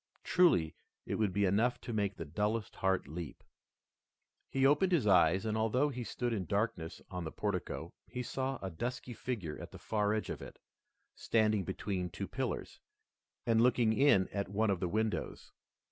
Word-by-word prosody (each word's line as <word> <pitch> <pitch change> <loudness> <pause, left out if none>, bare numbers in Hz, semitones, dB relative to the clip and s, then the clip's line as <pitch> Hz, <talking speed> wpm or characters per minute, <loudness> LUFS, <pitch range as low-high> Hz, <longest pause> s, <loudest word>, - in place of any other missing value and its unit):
Truly 90 - +4 0.3
it - - -2
would 105 -3 +2
be 100 +2 +2
enough 110 +6 +2
to 120 - -5
make 100 -2 0
the 80 - -6
dullest 105 +7 -2
heart 95 -5 +1
leap. 80 0 -7 1.1
He 135 0 +2
opened 150 +7 +4
his 165 -10 +3
eyes, 95 0 +5
and 110 -1 0
although 115 +6 +2
he 125 -3 -4
stood 120 +1 -2
in 100 -5 -2
darkness 100 -3 -2
on 90 -1 -4
the 80 - -4
portico, 100 -4 -3
he 125 - -4
saw 135 +2 -2
a 95 - -3
dusky 120 +8 -4
figure 105 -11 -4
at - - -7
the - - -11
far 105 -1 0
edge 110 - -2
of - - -6
it, - - -9 0.6
standing 110 -3 +2
between 95 -2 -2
two - - -5
pillars, - - -3 0.7
and 115 -1 +4
looking 120 -2 +4
in 110 -7 +5
at 100 -2 -3
one 105 +1 +1
of 95 - 0
the 90 - -1
windows. 110 +2 -2
105 Hz, 175 wpm, -33 LUFS, 95-120 Hz, 1.1 s, eyes